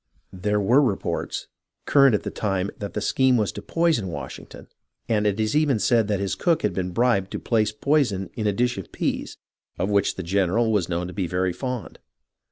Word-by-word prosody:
There 105 +3 0
were 120 +8 +4
reports 115 -9 -2 0.4
current 140 -5 +5
at - - -2
the - - -4
time 95 -2 -1
that 100 -1 -6
the 105 - -1
scheme 130 +3 +3
was 105 -3 0
to 105 - -8
poison 160 - +1
Washington, 70 -7 -8 0.4
and 105 -2 +1
it 105 +1 0
is 110 +3 0
even 150 -5 +3
said 115 0 +2
that 105 -2 0
his 100 -1 -1
cook 170 -2 +1
had 105 - +1
been 90 -1 -2
bribed 100 -1 +1
to - - -3
place 110 -3 +1
poison 105 - 0
in 110 -3 -2
a - - +3
dish 120 +1 0
of 95 - -9
peas, - - -3 0.4
of 95 +4 -1
which 100 -1 +2
the 95 - -5
general 100 +5 +1
was 100 -5 +1
known 85 0 -1
to 90 - -7
be 95 -2 -2
very 90 +1 0
fond. 125 +1 -5
105 Hz, 205 wpm, -24 LUFS, 95-120 Hz, 0.4 s, current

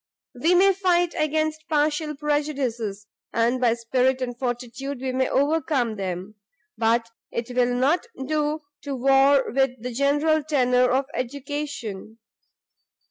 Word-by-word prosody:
We 320 +8 +2
may 390 +2 +5
fight 355 -2 +2
against 310 +1 -1
partial 300 0 +1
prejudices, 275 -8 -2 0.3
and 235 +2 +1
by 235 -2 +3
spirit 255 +3 +1
and 245 -2 -3
fortitude 250 +2 -4
we 260 0 -2
may 260 0 0
overcome 280 -5 +1
them; 190 +1 -5 0.4
but 230 +1 +1 0.2
it 235 +1 -5
will 245 0 +2
not 290 - +1 0.2
do 305 +1 -1 0.2
to 280 -2 -4
war 270 +1 +4
with 265 -1 +1
the 250 +3 -5
general 290 +4 +2
tenor 250 -4 +3
of 265 +2 +1
education. 255 -5 -5
265 Hz, 130 wpm, -24 LUFS, 245-300 Hz, 0.4 s, may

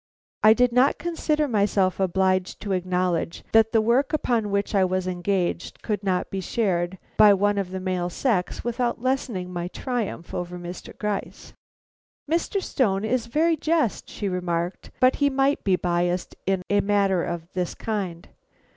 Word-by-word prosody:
I 215 0 +8
did 250 +1 +3
not 255 +3 +4
consider 310 -3 0
myself 200 -5 +1
obliged 185 0 +1
to 205 - -4
acknowledge 180 -2 -1
that 225 0 +5
the 225 - +4
work 250 +7 +2
upon 235 -8 +1
which 200 +1 -1
I 195 -2 +4
was 185 0 0
engaged 180 0 -2
could 210 -3 -2
not 185 -2 -1
be 195 - -2
shared 185 -3 -1 0.2
by 210 -2 +8
one 205 +1 +1
of 195 -2 -2
the 190 0 -4
male 185 -1 -1
sex 185 -1 -1
without 240 0 -1
lessening 235 -8 -2
my 175 0 -3
triumph 220 -4 -4
over 180 0 -4
Mr. 175 0 -8
Gryce. 210 -2 -4 0.7
"Mr. 340 +5 0
Stone 205 -5 0
is 235 +1 0
very 320 +7 +2
just," 310 -6 0
she 205 - -4
remarked, 175 -1 -2
"but 255 +1 +4
he 285 -1 +3
might 270 +1 +1
be 190 -2 +3
biased 175 0 -1
in 190 -1 +1
a 205 0 +3
matter 200 -3 +2
of 170 0 -5
this 180 -2 -2
kind. 190 -6 -4
200 Hz, 165 wpm, -24 LUFS, 180-235 Hz, 0.7 s, I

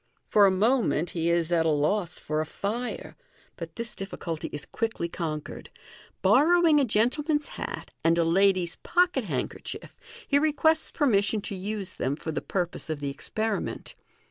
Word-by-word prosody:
For 205 -2 +6
a - - +5
moment 200 - +2
he 170 -1 0
is 170 0 +1
at 170 -2 +3
a 160 - +2
loss 165 +5 +1
for 155 0 -2
a - - -2
fire, 230 +8 -4 0.4
but 165 -1 -8
this 230 -1 -3
difficulty 170 -4 -5
is 145 -1 -5
quickly 225 -6 -2
conquered. 160 -3 -5 0.5
Borrowing 335 -1 +5
a 280 - +3
gentle 235 +6 +1
man's 300 -2 +1
hat, - - -6
and 165 +1 +4
a 170 - +4
lady's 185 0 +2
pocket 355 0 +1
handkerchief, - - -5 0.3
he 285 - +4
requests 315 +1 +2
permission 215 -7 +2
to 200 - -5
use 195 0 -4
them 135 +2 -1
for 160 +1 -5
the - - -3
purpose 175 -3 -3
of 155 -2 -2
the 140 -1 -3
experiment. 215 +8 -3
195 Hz, 165 wpm, -27 LUFS, 165-240 Hz, 0.5 s, For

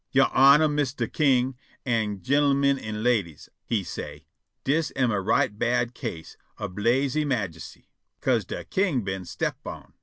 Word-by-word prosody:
"Your - - +4
Honor, 140 +4 +7
Mistah 145 -2 -1
King, 130 -3 +2 0.3
an' 110 -5 -1
gin'l'min 140 0 +3
an' 110 -2 -5
ladies," 105 -11 0
he 110 -4 -1
say', 85 - -7 0.4
"dis 155 +4 +1
am 125 -3 +2
a 100 -2 0
right 105 +1 +1
bad 120 +2 0
case 80 -8 -7 0.2
ob 90 - -5
lasy 135 +7 +2
majesty, 100 - -4 0.3
'ca'se - - +1
de - - -6
king 180 - 0
been 95 -1 -4
step 85 - -3
on. - - -9
125 Hz, 150 wpm, -26 LUFS, 105-140 Hz, 0.4 s, Honor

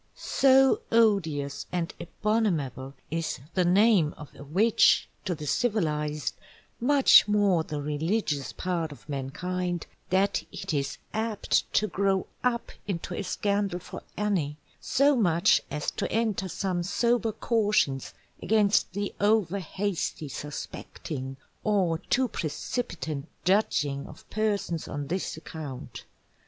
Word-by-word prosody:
_So 270 0 +4
Odious 160 -11 +2
and 175 -2 -2
Abominable 165 - -1 0.2
is 165 -4 -2
the 185 - +2
Name 185 -3 +4
of 150 -2 -11
a - - -11
Witch, 195 +11 +4 0.2
to 180 -3 -1
the 150 -1 -7
Civilized, 150 - 0 0.5
much 275 0 +6
more 205 -5 +3
the 150 -2 -4
Religious 150 0 -1
part 170 -4 -2
of 145 - -13
Mankind, 175 +5 -3 0.2
that 190 +2 +2
it - - -5
is 140 -2 -1 0.2
apt 220 -1 0
to 215 - +4
grow 195 -2 +1 0.2
up 240 -1 0 0.2
into 180 -2 -3
a - - -2
Scandal 200 0 0
for 180 - -9 0.2
any, 180 -9 0 0.2
so 280 +2 +3
much 180 -4 +4
as 150 +1 -2
to - - -3
enter 215 -4 0
some 185 -1 -1
sober 230 +5 +1
cautions 210 - +1 0.3
against 210 -3 +3
the 205 +1 -3
over 205 -2 +3
hasty 185 -3 -3
suspecting, 135 -1 -6 0.3
or 185 -6 +2
too 255 +8 +1
precipitant 160 - -4 0.2
Judging 150 -8 +1
of - - -14
Persons 205 -6 -1
on 145 0 -4
this 180 -2 -2
account. 155 -5 -8
180 Hz, 120 wpm, -28 LUFS, 150-210 Hz, 0.5 s, much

